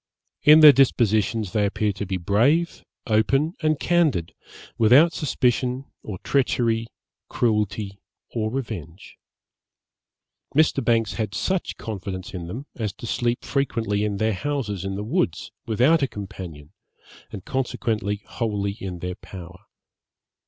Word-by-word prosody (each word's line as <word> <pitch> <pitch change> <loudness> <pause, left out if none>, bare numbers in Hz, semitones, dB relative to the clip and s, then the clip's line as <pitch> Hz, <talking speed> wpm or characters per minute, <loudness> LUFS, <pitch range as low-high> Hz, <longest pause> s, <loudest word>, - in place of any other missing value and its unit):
In 150 +1 +8
their 150 -1 +11
dispositions 110 -6 +2
they 105 - +2
appear 105 +1 0
to 100 0 -5
be 95 0 -1
brave, 120 - +1 0.2
open, 135 +8 +2
and 155 -2 +1
candid, 150 - +1 0.4
without 135 +10 +5
suspicion 125 -2 0 0.2
or 100 -3 -6
treachery, 115 -4 +1 0.4
cruelty 105 -3 -1 0.3
or 110 -2 -1
revenge. 100 - -6 1.4
Mr. 155 -3 +3
Banks 115 -1 +2
had 105 -3 -3
such 190 -1 -1
confidence 95 -4 -6
in 85 -3 -6
them, 120 +11 -6
as 110 -5 -3
to 115 - -10
sleep 120 +1 -1
frequently 115 -7 -1
in 105 -1 -1
their 110 +1 +1
houses 105 -3 -3
in 95 0 -3
the 100 - -4
woods, 170 - -1 0.2
without 125 +9 +3
a 135 - +2
companion, 90 - -9 0.6
and 100 -2 -8
consequently 110 -6 -2
wholly 105 -4 -2
in 95 -4 -6
their 90 +1 -4
power. 95 -1 -11
110 Hz, 130 wpm, -24 LUFS, 100-135 Hz, 1.4 s, their